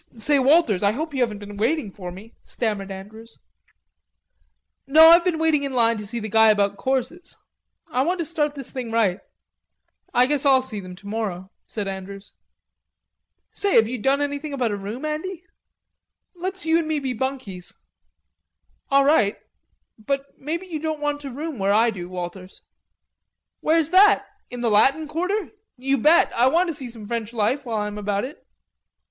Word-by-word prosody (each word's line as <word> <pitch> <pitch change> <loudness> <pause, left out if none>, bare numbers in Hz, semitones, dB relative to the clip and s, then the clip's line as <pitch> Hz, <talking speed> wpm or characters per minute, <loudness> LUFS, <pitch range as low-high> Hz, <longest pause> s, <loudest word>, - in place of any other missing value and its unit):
"Say, 280 +6 +2
Walters, 265 - +4
I 200 0 +2
hope 310 +5 -4
you 265 - -1
haven't 225 -4 0
been 205 0 -10
waiting 235 0 0
for 180 -2 -8
me," 205 +6 -12
stammered 210 -4 -3
Andrews. 215 +4 -10 1.5
"No, 315 +4 +8
I've 340 +1 +7
been 355 -3 0
waiting 320 -2 +2
in 280 -1 -4
line 230 -2 +3
to 210 - -6
see 235 - -4
the 215 - -5
guy 220 +1 +5
about 200 -1 +2
courses.... 265 - -3 0.5
I 250 - +1
want 350 +7 0
to 335 - -2
start 300 -2 -1
this 275 -3 -7
thing 250 -3 -5
right." 215 -5 +1 0.9
"I 245 +1 +4
guess 285 +1 +1
I'll 265 -2 +5
see 220 -5 -5
them 185 -2 -9
tomorrow," 200 -2 -5 0.2
said 210 -3 -4
Andrews. 195 +1 -7 1.2
"Say 400 -1 +1
have 220 - +6
you 250 +1 -4
done 270 +5 +2
anything 285 +1 -3
about 250 -5 -1
a - - -1
room, 210 +8 -6
Andy? 325 +4 -4 0.9
Let's 370 0 -4
you 325 +1 +3
and 325 - -3
me 315 -1 0
be 270 -3 -2
bunkies." 245 -8 -5 1.1
"All 275 -1 +4
right.... 245 -9 +3 0.6
But 275 +5 -3
maybe 330 +6 -4
you 330 -4 -5
won't 315 -1 -2
want 290 0 -2
to 280 - -6
room 290 0 -6
where 195 +1 +2
I 225 +2 +4
do, 180 -4 -7
Walters." 185 +1 -8 1.0
"Where's 320 0 +1
that? 405 +3 +6 0.2
In 245 -1 -7
the 235 -2 +1
Latin 275 +9 +4
Quarter?... 365 +7 -2 0.3
You 270 +2 0
bet. 310 +8 +4
I 240 +2 +3
want 340 +6 +2
to - - -2
see 270 -4 -5
some 225 -3 -8
French 230 0 -4
life 245 +5 -1
while 225 -2 -2
I 210 - -1
am 210 0 -5
about 205 +1 -1
it." 280 - -11
255 Hz, 180 wpm, -23 LUFS, 210-305 Hz, 1.5 s, No